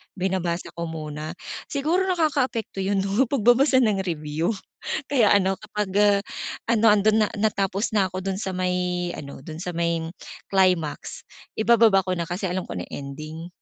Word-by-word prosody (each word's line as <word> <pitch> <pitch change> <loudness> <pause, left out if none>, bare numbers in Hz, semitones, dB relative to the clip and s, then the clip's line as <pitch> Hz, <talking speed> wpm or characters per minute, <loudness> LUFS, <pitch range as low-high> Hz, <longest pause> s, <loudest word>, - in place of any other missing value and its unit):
binabasa 180 -2 -2
ko 170 0 -5
muna. 155 0 -6 0.3
Siguro 325 +7 0
nakakaapekto 280 - 0
'yon, 195 0 +1
'no, 200 +7 +2
pagbabasa 260 +2 +4
ng 210 -4 +2
review. 160 +4 -1 0.5
Kaya 245 -7 +4
ano, 195 -1 +3
kapag, 210 +1 -4
uh, 205 -1 +5 0.5
ano, 225 -2 +5
ando'n 210 +1 +4
na - - -1
natapos 200 -1 +1
na 190 -3 +2
ako 185 - -3
do'n 190 0 -2
sa 190 -1 -3
may 180 -1 -1
ano, 140 -2 -8
do'n 155 +3 -8
sa 180 - -3
may 170 -1 0 0.5
climax, 185 -5 +1 0.3
ibababa 220 -3 +5
ko 185 - -1
na, 170 -2 -2
kasi 180 +3 -4
alam 185 0 -2
ko 100 - -5
na 90 - -3
ending. 155 +4 -7
190 Hz, 160 wpm, -24 LUFS, 170-215 Hz, 0.5 s, uh